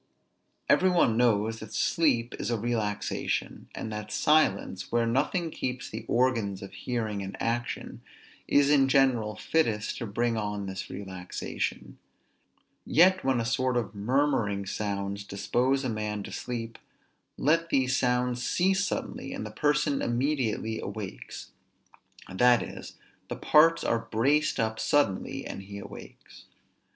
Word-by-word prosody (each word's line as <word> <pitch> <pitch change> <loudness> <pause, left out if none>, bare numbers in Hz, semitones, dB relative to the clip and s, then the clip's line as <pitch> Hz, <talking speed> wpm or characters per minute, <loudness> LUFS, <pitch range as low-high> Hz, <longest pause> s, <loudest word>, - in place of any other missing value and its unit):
Every 185 - +5
one 170 -11 +3
knows 115 -2 +2
that 110 0 -9
sleep 125 -8 +2
is 105 - -2
a 120 - +1
relaxation; 110 -2 -2
and 110 - -5
that 105 0 -6
silence, 150 -12 +2
where 120 0 +2
nothing 150 +8 0
keeps 125 -3 -4
the 110 +1 -6
organs 115 -6 +1
of 100 - -9
hearing 110 -5 -3
in 95 0 -6
action, 120 +1 -3 0.5
is 145 0 +4
in 135 -2 +5
general 130 -6 +3
fittest 110 -4 0
to 115 - -4
bring 115 +2 0
on 105 -1 -3
this 95 -1 -6
relaxation; 95 -2 -5 0.8
yet 185 +4 +4
when 130 -2 +2
a 115 - -1
sort 125 +2 +1
of 115 -4 -2
murmuring 110 -2 +1
sounds 100 0 -3
dispose 125 +7 0
a - - -1
man 105 -2 -3
to - - -8
sleep, 115 -2 -5 0.6
let 165 +3 +2
these 130 -2 +2
sounds 125 -1 +1
cease 190 +2 +2
suddenly, 180 - -4
and - - -5
the 105 - -7
person 145 +3 +1
immediately 120 -3 -1
awakes; 105 -4 -7 0.8
that 120 +6 +4
is, - - -9 0.3
the - - -4
parts 165 +2 +4
are 115 - +1
braced 130 +7 +1
up 110 -1 -1
suddenly, 135 -1 +1
and - - -6
he 100 +1 -9
awakes. 100 - -12
115 Hz, 140 wpm, -28 LUFS, 105-135 Hz, 0.8 s, Every